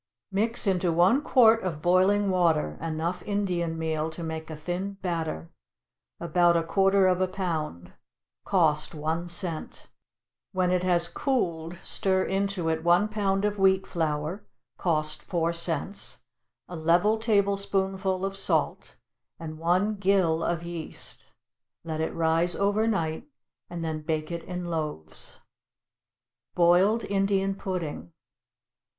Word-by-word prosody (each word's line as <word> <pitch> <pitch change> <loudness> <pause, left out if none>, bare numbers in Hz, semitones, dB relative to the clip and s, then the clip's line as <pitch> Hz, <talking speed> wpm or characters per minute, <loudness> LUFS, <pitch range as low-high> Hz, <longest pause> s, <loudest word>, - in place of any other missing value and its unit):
= - - -64
Mix 225 +5 +1
into 180 -3 +1
one 180 - +4
quart 230 -6 +5
of 170 -5 -3
boiling 190 +3 +3
water 165 - +2
enough 165 +2 -2
Indian 180 -5 -1
meal 160 -1 -1
to 160 +1 -8
make 160 0 -5
a 155 - -5
thin 180 +6 -4
batter, 160 - -3 0.7
about 170 +1 +3
a 165 - +1
quarter 195 +3 +3
of 185 0 +2
a 185 - +2
pound, 160 - -4 0.5
(cost 160 -4 +1
one 160 +3 -2
cent;) 175 -2 -5 0.6
when 185 -1 +1
it 180 -1 +2
has 175 -2 +2
cooled, 170 - -2
stir 190 -1 +1
into 195 -3 -1
it 160 0 -1
one 175 +5 +4
pound 200 -2 0
of 210 -1 -1
wheat 190 0 +4
flour, 160 +3 -2 0.3
(cost 155 -3 0
four 170 -1 -1
cents,) 170 +3 -3 0.4
a 180 - -7
level 175 +7 +3
tablespoonful 195 -3 0
of 195 0 -3
salt, 195 - -1 0.4
and 155 -1 -7
one 185 +6 +1
gill 185 -5 +2
of 170 -1 -1
yeast; 170 -2 -6 0.6
let 160 -1 -3
it 160 - -1
rise 165 +2 +2
overnight, 200 - 0 0.4
and 170 -1 -5
then 155 -1 -3
bake 155 +1 -2
it 170 0 -3
in 180 -1 -5
loaves. 150 - -5 1.1
=Boiled 180 +6 +4
Indian 195 0 +1
Pudding. 180 - -5
175 Hz, 130 wpm, -27 LUFS, 160-195 Hz, 1.1 s, quart